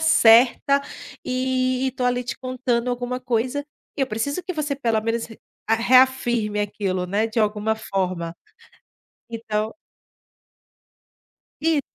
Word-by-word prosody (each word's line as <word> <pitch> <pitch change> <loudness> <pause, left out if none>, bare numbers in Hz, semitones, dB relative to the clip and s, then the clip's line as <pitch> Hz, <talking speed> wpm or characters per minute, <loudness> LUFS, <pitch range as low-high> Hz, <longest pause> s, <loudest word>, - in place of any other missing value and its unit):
certa 260 -1 +5 0.4
e 255 0 0
e - - 0
tô 255 -1 -3
ali 245 0 +1
te 245 - -4
contando 255 -2 -1
alguma 245 +1 -3
coisa, 250 +3 -1 0.3
e - - -3
eu 270 - +2
preciso 270 +9 -2
que 365 - -4
você 300 -3 -2
pelo 230 -5 0
menos 230 +1 -1
re 225 - -13 0.3
reafirme 240 -2 +3
aquilo, 195 -3 -2
né, 205 +4 +1
de 220 - -3
alguma 215 0 +1
forma, 185 -5 -3 1.0
então. 220 0 -3 1.9
I 320 -3 +3
240 Hz, 125 wpm, -23 LUFS, 220-260 Hz, 1.9 s, certa